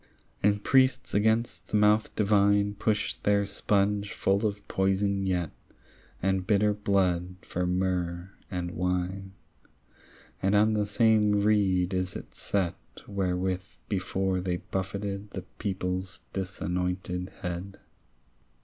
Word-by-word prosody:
And 105 0 +2
priests 130 -1 +3
against 110 +3 +1
the 105 - +1
mouth 105 +1 +3
divine 100 -1 +3
Push 105 +1 0
their 100 0 +3
sponge 100 0 0
full 100 +3 +2
of 100 -1 -6
poison 95 0 +1
yet 90 -3 0 0.7
And 95 -1 +1
bitter 105 0 +3
blood 90 -3 +1
for 90 0 -2
myrrh 90 0 -1 0.2
and 90 -3 -3
wine, 90 +2 -2 1.1
And 100 +2 +2
on 110 +2 +4
the 105 -1 +1
same 105 -1 +3
reed 95 -3 +2
is 95 0 -1
it - - -8
set 95 -4 -1 0.3
Wherewith 95 -2 -1 0.3
before 95 -1 0
they 90 -1 -1
buffeted 100 +2 -4
The 95 -2 -6 0.2
people's 95 -2 -3
disanointed 90 -1 -2
head. 90 +2 -5
95 Hz, 115 wpm, -28 LUFS, 90-105 Hz, 1.1 s, on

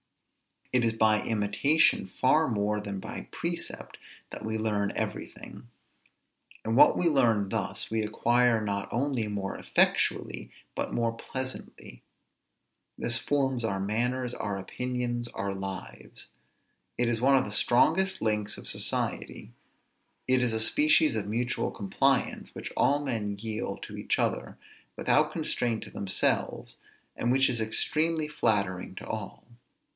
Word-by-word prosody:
It 125 -1 +3
is 115 - +1
by 110 -1 +3
imitation 110 +4 +3
far 130 - +2
more 105 -2 0
than 100 -2 -5
by - - -7
precept, - - -5 0.3
that - - -8
we 110 0 -2
learn 105 -2 0
everything; - - -6 1.0
and 110 +1 -1
what - - +7
we 175 - +2
learn 115 -10 +3
thus, 110 -1 -2
we 110 0 +1
acquire 120 +2 +2
not 100 -1 -2
only 125 -2 -1
more 100 -2 -4
effectually, - - +1 0.3
but - - -3
more 115 -1 +1
pleasantly. 130 - -7 1.0
This 115 -1 0
forms 135 -1 0
our 100 -3 -1
manners, 120 +5 -1
our 100 -1 -3
opinions, 120 +3 -3
our 100 -4 -4
lives. 95 -1 -7 0.7
It 120 - +1
is 115 -2 0
one 135 +2 +5
of 130 - +2
the 105 - -6
strongest 170 - +3
links 105 -1 0
of - - -4
society; - - -1 0.7
it 130 0 +3
is 120 -2 +1
a 110 - 0
species 150 +4 +4
of 100 -2 -3
mutual 120 +4 -1
compliance, 125 +6 0
which - - -6
all 145 +1 +3
men 110 -7 -2
yield 110 +1 -4
to - - -8
each - - -1
other, - - -1 0.4
without - - +2
constraint 115 -3 -1
to - - -11
themselves, 100 -1 -1 0.4
and 120 - -1
which 135 +1 +4
is 120 -2 -1
extremely 155 +8 0
flattering 100 -10 -1
to - - -8
all. - - -6
115 Hz, 140 wpm, -28 LUFS, 105-130 Hz, 1.0 s, what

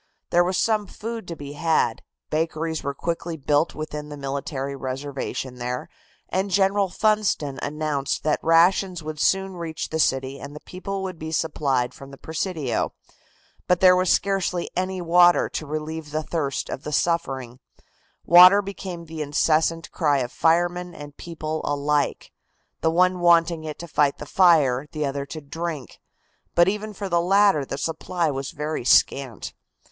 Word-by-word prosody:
There 175 0 +5
was 185 +1 -1
some 215 -2 +1
food 225 0 -6
to 170 - -5
be 145 -2 -8
had, 160 +2 +1 0.3
bakeries 160 0 -1
were 140 0 -4
quickly 170 +1 -3
built 145 +2 +1
within 150 -1 -6
the 145 - -7
military 140 0 -4
reservation 135 -1 -5
there, 125 +1 -4 0.4
and 190 +2 -1
General 195 +1 +2
Funston 205 -10 0
announced 145 -1 -2
that 155 -1 +1
rations 175 +1 +3
would 155 0 -6
soon 190 +1 +1
reach 165 -2 -5
the 160 - -2
city 135 -2 0
and 145 - -9
the - - -7
people 195 +1 -5
would 185 -3 -5
be 160 0 -5
supplied 140 -6 0
from 135 - -12
the 135 - -12
Presidio. 160 - -2 0.7
But 180 -1 +3
there 185 0 +7
was 185 -1 +1
scarcely 190 -3 0
any 185 0 -2
water 175 +1 +5
to 155 - -5
relieve 155 +1 -5
the 155 +1 -2
thirst 145 -5 -2
of - - -5
the 150 - -6
suffering. 135 -7 -1 0.7
Water 180 +4 +8
became 190 -3 -7
the 160 -1 -7
incessant 160 +3 +1
cry 150 -4 +2
of 125 -2 -2
firemen 175 +1 +1
and 145 -1 -10
people 160 -2 -5
alike, 145 0 -1 0.5
the 160 - +1
one 180 +2 +3
wanting 170 -2 +3
it 155 -1 -5
to 170 - -8
fight 145 -3 +1
the - - -8
fire, 150 -6 +4
the 155 -1 -1
other 140 0 -3
to 155 - -7
drink, 150 -2 -6 0.6
but 175 +1 +5
even 210 +2 -2
for 200 -1 -5
the 170 -2 +2
latter 195 -3 +4
the 135 - -5
supply 165 +1 -1
was 135 -1 -4
very 150 -2 -4
scant. 130 0 +2
160 Hz, 160 wpm, -24 LUFS, 145-180 Hz, 0.7 s, Water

